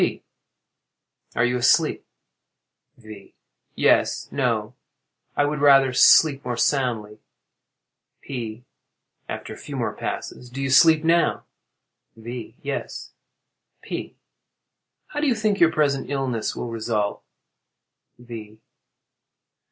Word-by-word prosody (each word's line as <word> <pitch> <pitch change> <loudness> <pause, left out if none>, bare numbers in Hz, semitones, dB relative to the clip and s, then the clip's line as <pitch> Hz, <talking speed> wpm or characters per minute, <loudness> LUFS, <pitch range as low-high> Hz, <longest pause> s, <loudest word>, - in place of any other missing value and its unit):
P. - - 0 1.1
Are 115 - +3
you 125 0 0
asleep? 120 - +2 0.9
V. 110 -4 -13 0.4
Yes—no; - - +1 0.6
I 145 - +3
would 150 0 -2
rather 135 -2 +5
sleep 140 +1 +6
more 120 -3 -3
soundly. 115 -7 0 1.0
P. 120 -3 -6 0.6
[After - - -6
a - - -11
few - - -8
more - - -2
passes.] 125 - -6
Do 130 +3 -8
you 135 -1 -1
sleep 160 +3 +6
now? 170 +1 +2 0.7
V. 115 0 -8
Yes. 140 0 -5 0.7
P. - - -6 0.9
How 295 - -4
do 300 - +1
you 250 - +2
think 215 -2 0
your 165 -1 +5
present 145 -4 0
illness 130 -5 -2
will 120 - -5
result? 110 -2 -2 1.0
_V. 110 -3 -10
125 Hz, 105 wpm, -23 LUFS, 115-145 Hz, 1.1 s, sleep